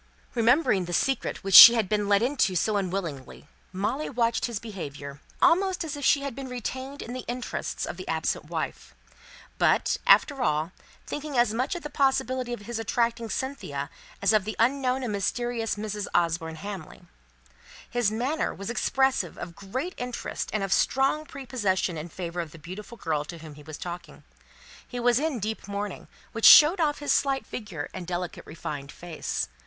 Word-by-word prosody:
Remembering 235 Hz, -, +3 dB
the 175 Hz, -, -6 dB
secret 265 Hz, +10 st, 0 dB
which 195 Hz, 0 st, -3 dB
she 235 Hz, -, +13 dB
had 220 Hz, -4 st, +1 dB
been 210 Hz, 0 st, 0 dB
let 200 Hz, +2 st, +4 dB
into 245 Hz, -8 st, +1 dB
so 215 Hz, +4 st, +1 dB
unwillingly, 175 Hz, -9 st, -4 dB, 0.2 s
Molly 210 Hz, +10 st, -2 dB
watched 235 Hz, -2 st, 0 dB
his 235 Hz, -3 st, -3 dB
behaviour, 145 Hz, -10 st, -8 dB, 0.2 s
almost 370 Hz, +1 st, +3 dB
as 310 Hz, -3 st, -4 dB
if 285 Hz, -, -7 dB
she 280 Hz, -, +4 dB
had 280 Hz, -2 st, -4 dB
been 270 Hz, +2 st, -7 dB
retained 260 Hz, +3 st, -5 dB
in 240 Hz, -, -7 dB
the 255 Hz, -1 st, -5 dB
interest 245 Hz, +1 st, -4 dB
of -, -, -6 dB
the -, -, -8 dB
absent -, -, -1 dB
wife; -, -, -5 dB, 0.6 s
but, -, -, +3 dB
after 280 Hz, -3 st, +5 dB
all, 155 Hz, -6 st, 0 dB, 0.3 s
thinking 295 Hz, -2 st, -5 dB
as 240 Hz, -3 st, +3 dB
much 255 Hz, +7 st, -1 dB
of 350 Hz, -, -6 dB
the 295 Hz, -, -5 dB
possibility 265 Hz, -3 st, +1 dB
of 240 Hz, -, -4 dB
his 225 Hz, +2 st, -5 dB
attracting 230 Hz, 0 st, -1 dB
Cynthia 145 Hz, -, -4 dB, 0.3 s
as 200 Hz, +2 st, +4 dB
of 215 Hz, -2 st, +4 dB
the 215 Hz, +2 st, -5 dB
unknown 260 Hz, +2 st, +1 dB
and 240 Hz, -, -2 dB
mysterious 230 Hz, +3 st, -1 dB
Mrs. 210 Hz, -1 st, -4 dB
Osborne 165 Hz, -1 st, 0 dB
Hamley. 195 Hz, -2 st, -8 dB, 0.8 s
His 240 Hz, -3 st, +1 dB
manner 250 Hz, +9 st, -1 dB
was 200 Hz, +3 st, -5 dB
expressive 265 Hz, -, +1 dB
of 170 Hz, -, -7 dB
great 255 Hz, -, -4 dB
interest 245 Hz, -1 st, -4 dB
and 215 Hz, -2 st, -1 dB
of 195 Hz, -, +1 dB
strong 275 Hz, +4 st, +1 dB
prepossession 210 Hz, -10 st, -1 dB
in 160 Hz, +2 st, -6 dB
favour 175 Hz, 0 st, -4 dB
of 165 Hz, -, -7 dB
the -, -, -12 dB
beautiful 190 Hz, +9 st, -9 dB
girl 155 Hz, -6 st, -1 dB
to 170 Hz, -, -8 dB
whom 160 Hz, -2 st, -11 dB
he 150 Hz, -, -13 dB
was 155 Hz, +1 st, -9 dB
talking. 175 Hz, -3 st, -8 dB, 0.6 s
He 245 Hz, -, -6 dB
was 240 Hz, 0 st, +3 dB
in 305 Hz, -3 st, -1 dB
deep 215 Hz, 0 st, -4 dB
mourning, 200 Hz, -1 st, -5 dB, 0.2 s
which 225 Hz, -, -1 dB
showed 320 Hz, +5 st, +9 dB
off 300 Hz, -3 st, +1 dB
his 290 Hz, -, 0 dB
slight 275 Hz, -1 st, +1 dB
figure 185 Hz, -10 st, -6 dB
and 180 Hz, -2 st, -7 dB
delicate 180 Hz, -1 st, -4 dB
refined 145 Hz, -3 st, -6 dB
face. 170 Hz, -2 st, -4 dB
220 Hz, 180 wpm, -27 LUFS, 180-260 Hz, 0.8 s, she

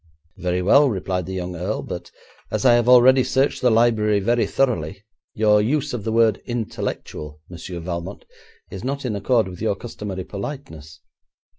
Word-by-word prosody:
'Very 90 Hz, 0 st, -2 dB
well,' 140 Hz, +9 st, +5 dB
replied 95 Hz, -4 st, -3 dB
the 95 Hz, -, -5 dB
young 90 Hz, -1 st, -4 dB
earl, 90 Hz, +2 st, -3 dB
'but -, -, -7 dB, 0.4 s
as 110 Hz, +4 st, -2 dB
I 125 Hz, -, +7 dB
have 120 Hz, 0 st, +3 dB
already 125 Hz, +1 st, +7 dB
searched 135 Hz, +3 st, 0 dB
the 125 Hz, -, +4 dB
library 110 Hz, -2 st, +3 dB
very 120 Hz, +4 st, +1 dB
thoroughly, 105 Hz, -, -1 dB, 0.3 s
your 105 Hz, -1 st, +4 dB
use 135 Hz, +6 st, -1 dB
of 115 Hz, -5 st, -4 dB
the 110 Hz, -, -1 dB
word 115 Hz, -2 st, +3 dB
"intellectual", 90 Hz, -9 st, -5 dB
Monsieur 90 Hz, +1 st, -7 dB
Valmont, 85 Hz, +2 st, -6 dB, 0.5 s
is -, -, -7 dB
not 140 Hz, +1 st, -3 dB
in 115 Hz, -4 st, -2 dB
accord 110 Hz, +2 st, +1 dB
with 90 Hz, 0 st, -9 dB
your 110 Hz, -2 st, 0 dB
customary 100 Hz, -4 st, -6 dB
politeness. 85 Hz, -, -8 dB
105 Hz, 165 wpm, -22 LUFS, 90-120 Hz, 0.5 s, I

